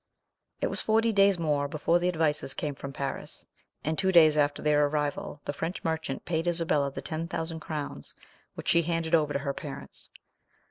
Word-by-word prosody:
It - - +2
was - - -1
forty 225 +1 +2
days 195 -1 +5
more 150 -4 +1
before 155 +4 +1
the 175 - 0
advices 155 -5 +1
came 150 -1 -2
from 140 0 -7
Paris, 135 0 -4 0.4
and 155 +1 -1
two 190 -1 +2
days 160 -4 +7
after 145 -1 +2
their 150 -1 +4
arrival 145 0 -2
the 145 - -2
French 165 +5 -4
merchant 160 -4 -2
paid 165 0 -1
Isabella 165 -5 +1
the 135 0 -6
ten 160 +3 -3
thousand 165 -1 -3
crowns, 150 - -5 0.4
which - - -8
she 170 - +5
handed 165 0 -2
over 155 -3 +4
to - - +2
her 140 - 0
parents. 140 -1 -8
155 Hz, 185 wpm, -28 LUFS, 145-170 Hz, 0.4 s, days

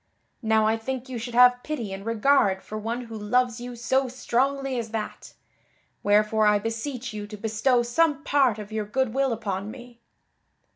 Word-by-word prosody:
Now 220 -2 +3
I 220 +1 +2
think 260 +3 -5
you 250 -2 -4
should 235 +1 -6
have 250 0 +6
pity 240 -11 -4
and 195 0 -7
regard 225 -3 +2
for 215 - -8
one 225 +3 -3
who 230 -2 -9
loves 235 +3 0
you 245 0 -6
so 260 +3 +1
strongly 260 +1 -1
as 230 -1 -5
that; 215 -1 -6 0.7
wherefore 210 +1 +3
I 210 0 +5
beseech 225 +3 -4
you 210 -1 -6
to 210 0 -9
bestow 225 +4 +1
some 295 +4 +1
part 270 -6 +3
of 210 0 -8
your 215 -1 -2
good 245 +2 -1
will 270 0 +1
upon 205 -3 -3
me." 240 0 -11
235 Hz, 180 wpm, -25 LUFS, 215-255 Hz, 0.7 s, have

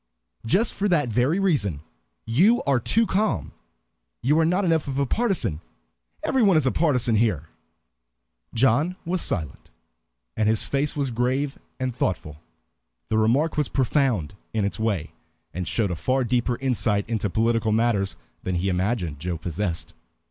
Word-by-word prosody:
"Just 210 - +3
for 205 - -1
that 150 -8 +2
very 130 - +2
reason; 135 - +1 0.4
you 185 - +3
are 140 -3 +2
too 225 - +2
calm. 210 +1 0 0.7
You 150 +6 +3
are 165 - +4
not 180 +4 +1
enough 165 -3 +1
of 135 -1 -3
a 140 - +2
partisan. 180 - 0 0.6
Every 265 - +1
one 195 -6 +5
is 155 - +2
a 130 - +3
partisan 125 -8 +2
here." 90 -9 0 1.0
John 135 +9 +2
was 175 +1 -1
silent, 80 -9 -3 0.7
and 110 -1 +2
his 110 -1 +3
face 140 +2 0
was 140 -3 -1
grave 130 +4 -1 0.2
and 130 -1 -1
thoughtful. 80 -9 -3 0.7
The 110 - +2
remark 135 +10 +2
was 150 -3 +1
profound 125 - +1 0.2
in 105 -2 +1
its 100 -1 -3
way, 105 -8 -1 0.4
and 90 -1 -4
showed 105 -5 0
a - - -1
far 130 +10 0
deeper 120 0 0
insight 115 -6 0
into 110 -3 -1
political 115 +2 +1
matters 110 -3 +1 0.2
than 95 - -2
he 90 +3 0
imagined 90 -5 -1
Joe 85 +1 -3
possessed. 85 +1 -3
120 Hz, 155 wpm, -24 LUFS, 100-150 Hz, 1.0 s, one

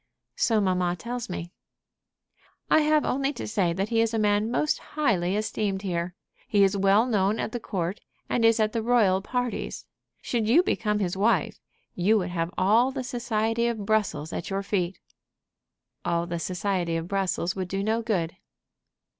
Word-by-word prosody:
"So 225 -3 +2
mamma 180 -3 +1
tells 240 +3 -5
me." 175 -1 -5 1.2
"I - - +7
have 305 0 +3
only 275 +1 0
to 245 - -6
say 195 -5 +1
that 190 +5 -2
he 225 -1 +2
is 230 0 0
a - - +1
man 210 0 +2
most 300 +5 +1
highly 200 - 0
esteemed 210 -2 -2
here. 175 -1 -2 0.3
He 205 -2 +4
is 195 +1 +3
well 200 +3 +4
known 210 -3 +1
at - - -2
the 240 - -3
court, 185 -2 -3 0.3
and 235 - 0
is 225 0 +5
at 215 -1 +1
the 230 - 0
royal 220 -5 +3
parties. 245 +3 -3 0.3
Should 230 -3 -1
you 320 +10 +6
become 210 - 0
his 190 -3 -1
wife, 200 -3 +1 0.3
you 200 +5 +3
would 185 -3 -1
have 165 -1 -1
all 220 +7 +4
the 265 -1 -4
society 235 -2 0
of 220 -4 -3
Brussels 200 -8 0
at - - -4
your 195 0 -2
feet." 190 -2 -1 1.1
"All 170 0 0
the 170 -1 -4
society 180 -1 -1
of 165 +1 -4
Brussels 190 -2 -1
would 185 -2 -3
do 195 +2 -2
no 220 +2 +1
good." 185 -8 -1
205 Hz, 175 wpm, -26 LUFS, 185-230 Hz, 1.2 s, I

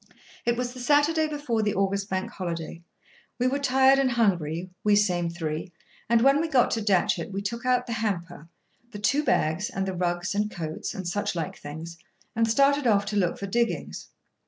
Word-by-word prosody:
It 235 0 +2
was 245 0 -2
the 255 - -10
Saturday 295 +4 +3
before 290 -7 -2
the 210 -1 0
August 195 +1 0
Bank 190 0 -2
Holiday. 170 -3 -5 0.6
We 250 - 0
were 270 +3 +1
tired 265 0 +4
and 270 -1 +3
hungry, 180 -6 0
we 210 -1 +4
same 180 -5 +2
three, 165 +1 -4 0.4
and 235 -1 +4
when 275 +3 +5
we 330 - -1
got 265 -6 +3
to 225 - 0
Datchet 190 -3 +1
we 195 +1 -4
took 235 +4 -4
out 250 -1 +2
the 235 - -4
hamper, 175 -7 -3 0.4
the 220 - -8
two 275 +9 +1
bags, 180 - +1
and 195 -7 -2
the 190 - -2
rugs 175 +1 -1
and 210 +1 0
coats, 160 -5 -5
and 185 -2 -5
such 205 +2 -2
like 165 -3 -3
things, 160 +3 -8 0.4
and 225 0 +2
started 280 +3 +3
off 205 -2 +3
to 210 0 -4
look 180 -4 +1
for 200 - -5
diggings. 235 +4 -2
205 Hz, 195 wpm, -26 LUFS, 175-250 Hz, 0.6 s, when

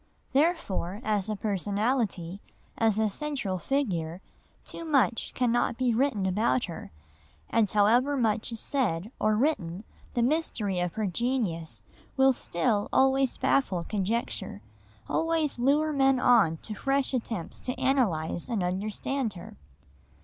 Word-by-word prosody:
Therefore 265 - 0
as 210 -2 0
a 215 - -1
personality, 200 -2 -1 0.3
as 220 -2 +2
a 220 0 +3
central 210 -5 -3
figure, 180 - -1 0.5
too - - -7
much 275 -7 +1
cannot 240 -1 +1
be 255 -2 +1
written 230 -5 +1
about 215 +6 +1
her, 170 - -8 0.6
and 220 -3 +3
however 240 +8 +3
much 225 -2 0
is 230 - -4
said 215 - -1
or 215 0 +2
written 210 - 0 0.3
the 240 - +2
mystery 240 - 0
of 175 -1 -1
her 220 - -1
genius 195 -5 -2 0.3
will 265 0 +5
still 205 0 -1
always 265 0 +3
baffle 190 -11 +1
conjecture, 210 +5 -3 0.4
always 325 -5 0
lure 295 +5 +2
men 270 -2 +3
on 220 -11 +4
to 215 - -6
fresh 275 +5 0
attempts 225 -8 -3
to 255 0 -4
analyse 230 - 0
and 220 -6 0
understand 210 +6 -2
her. 175 - -10
225 Hz, 130 wpm, -28 LUFS, 195-265 Hz, 0.6 s, will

